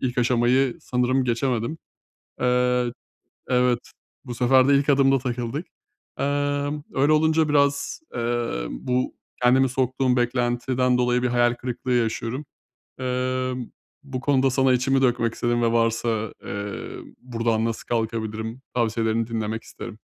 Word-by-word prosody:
İlk 125 0 -2
aşamayı 125 +1 +2
sanırım 125 +1 +1
geçemedim. 120 +3 -1 0.6
Eee, 125 -1 +2 0.6
evet. 125 -1 +1 0.3
Bu 120 -2 -6
sefer 130 +2 +4
de 140 - +6
ilk 140 +1 +2
adımda 135 -1 +4
takıldık. 125 +4 -3 0.5
Emm, 145 +1 -1
öyle 140 +3 +3
olunca 160 0 +3
biraz, 140 -1 +1
eee, 120 - -1
bu 125 - -2 0.3
kendimi 130 +2 +5
soktuğum 130 0 +1
beklentiden 125 +1 +1
dolayı 125 0 +2
bir 125 - +2
hayal 120 0 +3
kırıklığı 125 +1 -4
yaşıyorum. 120 +3 -1 0.6
Eee, 130 0 -1 0.5
bu 135 -3 -5
konuda 135 -1 +2
sana 130 0 +3
içimi 135 +2 +2
dökmek 120 -3 +2
istedim 120 0 0
ve 115 - +2
varsa, 115 -1 0
eee, 100 0 -5 0.3
buradan 115 -2 0
nasıl 115 -1 -3
kalkabilirim? 110 0 -3
Tavsiyelerini 115 -1 0
dinlemek 110 -1 -3
isterim. 110 -1 -9
125 Hz, 125 wpm, -24 LUFS, 115-130 Hz, 0.6 s, de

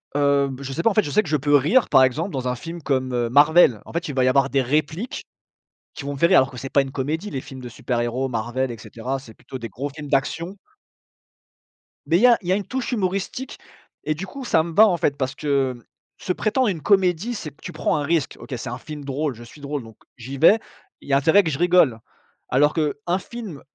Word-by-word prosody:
Heu, 140 -1 +3
beh, 135 +1 -7
je 135 0 -5
sais 170 - -3
pas, - - +5
en - - -1
fait, 215 - +3
je 145 - -5
sais 215 +5 +3
que 165 - -8
je 155 - +2
peux 145 +1 +2
rire, 160 - +3
par 130 - +6
exemple, 150 +9 0
dans 130 -4 -3
un 125 - -1
film 165 +7 -8
comme, 130 -3 -1
heu, 120 -1 0
Marvel, 145 -3 +5
en - - -12
fait, 170 0 -2
il 145 - -5
va 130 - +2
y - - +3
avoir 135 +1 +3
des 135 -1 +2
répliques 155 - -2 0.7
qui 145 - -8
vont 140 - -3
me 140 - -6
faire 170 - +4
rire 190 - +6
alors 130 +1 +3
que 125 - -10
c'est 135 - -5
pas 140 - +4
une 135 - -7
comédie, 155 +9 -3
les 135 - -3
films 130 0 -10
de 125 - -7
super 120 +1 -2
héros 125 +3 -1
Marvel 120 +2 -2
et 115 - -5
cetera, 125 +5 -5
c'est 125 -4 -13
plutôt 130 - -9
des 115 -2 -6
gros 135 +8 -4
films 145 +1 -9
d'action 165 +7 -1 1.5
mais 165 - +4
il - - +1
y 250 - +7
a 240 -2 +6
il 180 - -10
y - - +4
a - - +3
une 200 0 -3
touche 260 +4 -3
humoristique 200 +5 -3 0.5
et 155 - 0
du 170 - -5
coup, 265 +6 -8
ça 160 - +3
me 170 - -6
va, 220 +6 +7
en 180 - +2
fait, 145 -3 0
parce 130 +1 -2
que 135 -5 -1 0.3
se 185 - -3
prétendre 225 +5 +1
une 165 -6 -3
comédie, 195 +2 +2
c'est 160 - -6
que 140 - -30
tu - - -8
prends - - 0
un 145 - -1
risque, 155 -1 -1
OK, - - -9
c'est 120 - -6
un 120 - -5
film 150 +3 -8
drôle, 140 0 -2
je 120 - -12
suis 120 +5 -14
drôle, 140 -1 -4
donc 110 -2 -14 0.2
j'y 130 +3 -7
vais, 200 +10 +6 0.4
il - - -14
y - - +1
a - - +6
intérêt 160 +8 +4
que 160 - -1
je 140 - -4
rigole 175 -10 +4 0.5
alors 145 +4 +3
qu'un 160 +3 -1
film 210 -8 -8
145 Hz, 265 wpm, -22 LUFS, 130-175 Hz, 1.5 s, y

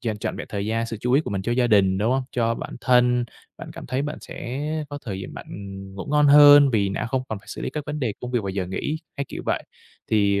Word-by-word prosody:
dành 110 -4 -3
trọn - - -3
vẹn - - -6
thời 100 -1 -3
gian, 115 +1 -1
sự 115 -1 -5
chú 125 +2 0
ý 140 - +5
của - - -6
mình 95 -1 -2
cho 120 - -1
gia 120 0 +2
đình, 95 -4 +3
đúng 110 +4 +1
hông? 135 0 +1
Cho 115 -1 +1
bản - - -7
thân, 125 -1 +3 0.3
bạn - - -8
cảm - - -9
thấy 130 +2 -1
bạn 150 +1 -4
sẽ 130 +4 -6 0.3
có 145 0 -6
thời 95 -4 -4
giờ - - -6
bạn, - - -9
ừm, 95 -1 -8
ngủ 95 - -7
ngon 150 0 +4
hơn 145 -1 +8
vì 100 -4 +2
đã 100 - -2
không 130 +2 -1
còn 110 - -4
phải 100 - -23
xử - - -7
lý - - -2
các 150 -2 -5
vấn 150 +1 -3
đề 120 -6 0
công 125 - -5
việc 120 -3 0
vào 100 - -4
giờ 95 -1 -3
nghỉ, 145 - -3 0.2
hay 140 - -2
kiểu - - -6
vậy. - - 0 0.5
Thì 100 -2 +3
120 Hz, 290 wpm, -24 LUFS, 100-135 Hz, 0.5 s, hơn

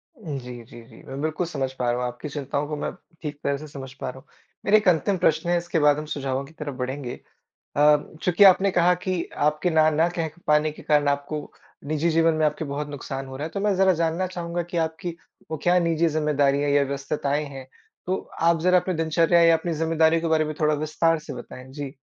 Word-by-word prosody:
जी, 135 - -7
जी, 120 +1 -13
जी, 115 -1 -16
मैं 135 +1 -7
बिल्कुल 155 +3 -1
समझ 135 -5 -3
पा 125 -1 +1
रहा 120 - -1
हूँ 125 - 0
आपकी 125 +5 -7
चिंताओं 145 0 -3
को 150 - -3
मैं - - -3 0.3
ठीक 150 -2 -5
तरह 140 0 0
से 155 +2 -9
समझ 135 -2 -9
पा 135 - -5
रहा 130 +1 -9
हूँ। 135 - -22 0.4
मेरा 210 +2 +6
1 210 -3 -1
अंतिम 180 +3 +3
प्रश्न 170 -1 +1
है 175 - +3
इसके 170 -1 -1
बाद 150 -1 +4
हम 155 - -4
सुझावों 135 -1 -2
की 150 - -16
तरफ 150 -4 -6
बढ़ेंगे। 130 0 -4 0.6
अ, 150 +1 +6 0.3
चूँकि 180 +3 +4
आपने 195 +1 +6
कहा 180 -1 +4
कि 180 -1 -2 0.2
आपके 150 +4 +1
ना 155 -1 +4
न 160 +2 +2
कह 165 -2 -1
क 160 +3 -20
पाने 150 +1 +3
के - - -13
कारण 145 -1 +2
आपको, 145 +1 -2 0.3
निजी 155 +3 0
जीवन 165 0 +3
में 155 0 +1
आपके 150 - -2
बहुत 145 +1 -4
नुकसान 135 -1 -6
हो 130 0 -8
रहा 145 - -4
है - - -7
तो 200 - -2
मैं 205 0 +2
ज़रा 190 0 +5
जानना 165 +2 0
चाहूँगा 175 -1 -4
कि - - -4
आपकी 165 +2 -5 0.3
वो 160 - -2
क्या 180 +1 +4
निजी 170 -1 +2
जिम्मेदारियाँ 145 -2 +1
या 145 0 +4
व्यस्तताएँ 140 +1 -2
हैं? 135 -2 -9 0.4
तो 185 - 0 0.2
आप 165 0 +3
ज़रा 180 +2 +4
अपनी 185 +1 -2
दिनचर्या 165 +1 +3
या 165 -1 +6
अपनी 170 +1 -3
ज़िम्मेदारियों 160 +1 +2
के 165 - 0
बारे 160 -1 +3
में 155 0 -4
थोड़ा 155 0 +3
विस्तार 155 +2 +1
से 155 - -8
बताएँ। 130 +1 -10
जी। 140 -1 -6
155 Hz, 230 wpm, -24 LUFS, 140-170 Hz, 0.6 s, मेरा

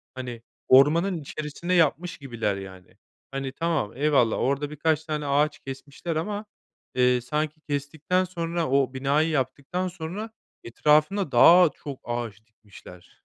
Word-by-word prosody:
Hani, 125 -3 -6 0.3
ormanın 165 +8 +5
içerisine 155 +4 -4
yapmış 170 0 +2
gibiler, 115 -7 -3
yani. 95 -2 -11 0.3
Hani, 135 -1 -4
tamam, 160 -7 -1
eyvallah, 140 -6 +3
orada 140 +2 0
birkaç 155 +1 0
tane 150 -2 -3
ağaç 145 +2 +1
kesmişler 140 +5 -6
ama, 205 +6 -3 0.5
eee, 125 -1 +3
sanki 150 +4 -3
kestikten 150 +5 -1
sonra, 170 -3 -3
o 135 -1 +2
binayı 140 +4 +1
yaptıktan 140 +6 -2
sonra 185 +6 -6 0.3
etrafına 150 - +2
daha 175 0 +7
çok 140 -3 -8
ağaç 115 -3 -5
dikmişler. 100 -5 -16
145 Hz, 125 wpm, -25 LUFS, 130-165 Hz, 0.5 s, daha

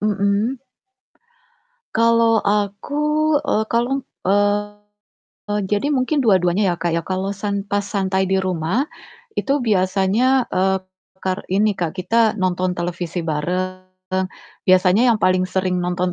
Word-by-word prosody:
Mhm. 210 +5 0 1.3
Kalau 230 0 +4
aku, 205 +6 -1 0.4
eee, 285 -7 0
kalong 240 +4 0 0.2
eee, 205 +1 0 0.7
jadi 205 +8 0
mungkin 280 +1 +1
dua-duanya 190 -4 +3
ya 175 - 0
Kak, 170 0 -1
ya. 170 - +1
Kalau 190 +2 -2
san 200 0 -3
pas 205 0 0
santai 190 -2 -1
di 190 - +2
rumah, 185 - 0 0.5
itu 280 +1 +1
biasanya, 210 +5 +2
eee, 190 +1 +2 0.5
kar 185 -1 0
ini 205 +3 +2
Kak, 175 -2 -4
kita 220 +3 +2
nonton 185 -1 0
televisi 175 0 -3
bareng. 180 +4 -2 0.9
Biasanya 185 +3 +5
yang - - -2
paling 185 0 +3
sering 185 -1 0
nonton 180 0 -1
195 Hz, 125 wpm, -20 LUFS, 185-215 Hz, 1.3 s, Biasanya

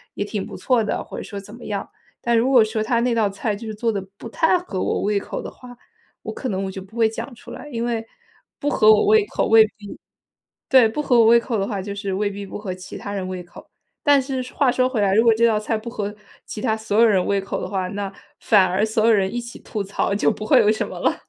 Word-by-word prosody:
也 - - -2
挺 205 -1 -4
不 - - -9
错 250 -3 +2
的。” 210 - -2
或 - - -9
者 - - -5
说 205 - -8
怎 205 +2 -12
么 240 - -12
样。 200 -2 -4 0.3
但 235 -1 +2
如 235 +3 +2
果 245 -4 +7
说 215 0 -2
他 235 +1 +1
那 245 0 +1
道 220 -3 +2
菜 205 +2 -2
就 220 +3 -8
是 215 - -5
做 230 +2 0
得 200 -2 -3 0.2
不 230 - -9
太 325 +9 +2
合 210 - -5
我 - - -1
胃 205 0 +1
口 - - -6
的 - - -7
话， 245 -1 -14 0.5
我 - - -5
可 260 - -5
能 195 -1 -2
我 190 - -4
就 190 - -7
不 195 +5 -13
会 225 -1 +4
讲 230 +4 -7
出 235 - -13
来。 295 - -9
因 235 -1 -2
为 230 -2 -2 0.5
不 290 - -1
合 215 -6 +5
我 215 - +4
胃 425 0 +5
口 - - -1
味 225 0 +7
未 220 - +5
必 205 -2 -10 0.7
对， 260 -4 +6
不 260 +7 -3
合 245 -4 +3
我 225 - +6
胃 235 +1 +7
口 230 -2 -2
的 195 - -1
话， 205 -3 -3
就 200 +1 -5
是 200 -1 -4
未 205 +2 0
必 200 0 -7
不 - - -7
合 200 -3 -4
其 185 0 -9
他 200 - -6
人 190 -2 -3
胃 185 -1 -5
口。 175 - -15 0.3
但 290 -1 +5
是 260 -1 -3
话 275 -3 +3
说 255 +1 +1
回 255 -4 -2
来， 195 -1 +2
如 220 +3 +4
果 230 - +6
这 230 +1 +3
道 220 -2 +2
菜， 220 +1 -2
不 215 +2 -10
合 210 -3 -4 0.3
其 - - -7
他 220 -4 +1
所 220 -1 -3
有 235 - +7
人 195 -5 +3
胃 200 0 +1
口 195 - -4
的 - - -4
话， 190 -2 -2
那 200 0 -4 0.3
反 205 -4 +4
而 185 +3 0
所 220 0 0
有 230 - +5
人 195 -2 +1
一 240 - -1
起 240 0 -10
吐 210 -3 -4
槽， 200 0 -1
就 210 - +2
不 215 - -6
会 - - +6
有 210 - +4
什 215 - -2
么 - - -8
了。 - - +1
220 Hz, 305 characters per minute, -22 LUFS, 200-235 Hz, 0.7 s, 果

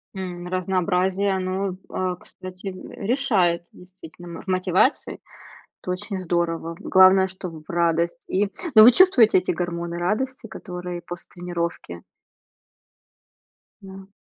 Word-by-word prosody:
М, 180 -2 -6
разнообразие 185 +1 0
оно, 185 0 -2
а, 185 -1 -2
кстати, 185 +2 -11
э, 190 +1 -7
решает, 190 -10 +1
действительно. 175 -2 -12
В - - -20
мотивации 185 - +1 0.6
это - - -5
очень 185 +2 -3
здорово, 170 -2 -2
главное, 190 0 +5
чтоб 180 -4 -8
в - - -11
радость 170 +5 0
и 200 +2 +1 0.3
ну 215 - +10
вы 240 - +9
чувствуете 250 - +6
эти 180 - -2
гормоны 170 -1 -3
радости, 225 +8 -2
которые 180 -4 -7
после 175 0 -8
тренировки? 170 - -5 1.8
Да. 190 0 -11
185 Hz, 120 wpm, -23 LUFS, 175-195 Hz, 1.8 s, ну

